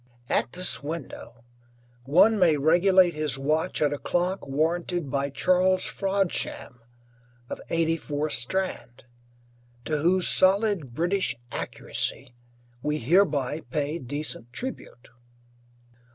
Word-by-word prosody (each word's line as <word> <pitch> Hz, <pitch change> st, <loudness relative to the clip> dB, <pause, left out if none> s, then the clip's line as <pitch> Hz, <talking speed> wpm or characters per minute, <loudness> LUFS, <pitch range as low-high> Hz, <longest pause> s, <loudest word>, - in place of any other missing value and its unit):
At -, -, +1 dB
this 180 Hz, 0 st, +2 dB
window 145 Hz, -5 st, -8 dB, 0.6 s
one 205 Hz, +10 st, +4 dB
may 165 Hz, -5 st, +4 dB
regulate 175 Hz, +4 st, +4 dB
his 150 Hz, -4 st, -2 dB
watch 155 Hz, +5 st, 0 dB
at 145 Hz, -, +1 dB
a 145 Hz, -, -5 dB
clock 180 Hz, 0 st, -2 dB
warranted 165 Hz, +2 st, -1 dB
by 140 Hz, 0 st, -1 dB
Charles 185 Hz, +5 st, +2 dB
Frodsham 195 Hz, -9 st, -1 dB, 0.7 s
of -, -, -5 dB
84, 160 Hz, -2 st, -1 dB
Strand, 125 Hz, -4 st, -2 dB, 0.8 s
to 155 Hz, -1 st, -1 dB
whose 180 Hz, +4 st, +2 dB
solid 190 Hz, -, +2 dB
British 175 Hz, -4 st, 0 dB, 0.2 s
accuracy 120 Hz, -, -3 dB, 0.5 s
we 150 Hz, +2 st, -1 dB
hereby 150 Hz, -, +2 dB
pay 150 Hz, +5 st, -3 dB
decent 145 Hz, -3 st, -6 dB
tribute. 245 Hz, -, -7 dB
160 Hz, 105 wpm, -26 LUFS, 140-185 Hz, 0.8 s, one